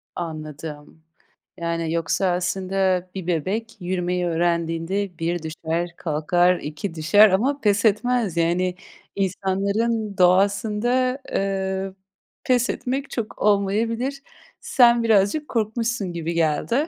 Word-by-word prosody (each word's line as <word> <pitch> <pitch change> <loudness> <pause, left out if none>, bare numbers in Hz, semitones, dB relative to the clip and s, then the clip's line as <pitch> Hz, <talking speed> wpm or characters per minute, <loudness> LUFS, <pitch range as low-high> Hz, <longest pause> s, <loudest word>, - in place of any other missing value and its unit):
Anladım. 155 -1 -7 0.5
Yani, 165 -1 -2
yoksa 170 +3 0
aslında 185 0 0
bir 185 -3 -5
bebek 195 +8 -2
yürümeyi 180 0 -1
öğrendiğinde 170 +2 -1
1 170 0 -2
düşer, 165 +2 -3
kalkar, 175 +3 +2
2 155 +5 -5
düşer 205 +7 +6
ama 260 +10 +1
pes 205 +1 +2
etmez. 220 -3 +1
Yani, 175 +2 +1 0.4
insanların 200 +3 -1
doğasında, 210 +8 +2
eee, 190 -1 -2 0.5
pes 245 -2 +2
etmek 270 +2 -3
çok 225 -3 -4
olmayabilir. 225 +7 +1 0.4
Sen 235 -2 +4
birazcık 225 +7 +2
korkmuşsun 225 -4 -1
gibi 170 0 -3
geldi. 170 - +1
190 Hz, 105 wpm, -23 LUFS, 170-220 Hz, 0.5 s, düşer